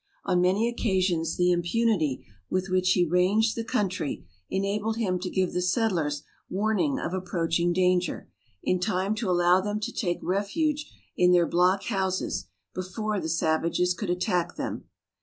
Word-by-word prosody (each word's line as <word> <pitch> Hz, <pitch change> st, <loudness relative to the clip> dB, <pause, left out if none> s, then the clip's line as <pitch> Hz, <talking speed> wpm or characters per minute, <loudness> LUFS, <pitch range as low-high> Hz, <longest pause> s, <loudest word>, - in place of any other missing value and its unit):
On 180 Hz, -, +2 dB
many 190 Hz, +6 st, +2 dB
occasions 185 Hz, -8 st, 0 dB
the 180 Hz, 0 st, +3 dB
impunity 175 Hz, -, +1 dB, 0.2 s
with 185 Hz, +1 st, -1 dB
which 185 Hz, 0 st, +3 dB
he 180 Hz, -, +3 dB
ranged 190 Hz, +6 st, +2 dB
the 230 Hz, -, -2 dB
country 190 Hz, -, -2 dB, 0.2 s
enabled 205 Hz, +3 st, -1 dB
him 185 Hz, -6 st, 0 dB
to 185 Hz, +1 st, -4 dB
give 185 Hz, -1 st, 0 dB
the 180 Hz, -, 0 dB
settlers 180 Hz, -7 st, 0 dB, 0.3 s
warning 220 Hz, -, 0 dB
of 230 Hz, -, -3 dB
approaching 175 Hz, -2 st, 0 dB
danger, 180 Hz, -1 st, +1 dB, 0.4 s
in 185 Hz, -, +1 dB
time 190 Hz, +1 st, 0 dB
to 215 Hz, -2 st, -2 dB
allow 175 Hz, +1 st, +4 dB
them 210 Hz, +2 st, -2 dB
to -, -, -3 dB
take 175 Hz, -6 st, -1 dB
refuge 290 Hz, -, -1 dB, 0.2 s
in 180 Hz, 0 st, +4 dB
their 175 Hz, -1 st, +5 dB
block 180 Hz, +3 st, +2 dB
houses 190 Hz, -, -2 dB, 0.3 s
before 200 Hz, +3 st, -3 dB
the 160 Hz, -2 st, -3 dB
savages 165 Hz, +2 st, +1 dB
could 180 Hz, +2 st, -5 dB
attack 180 Hz, -1 st, 0 dB
them. -, -, -4 dB
185 Hz, 155 wpm, -27 LUFS, 175-205 Hz, 0.4 s, their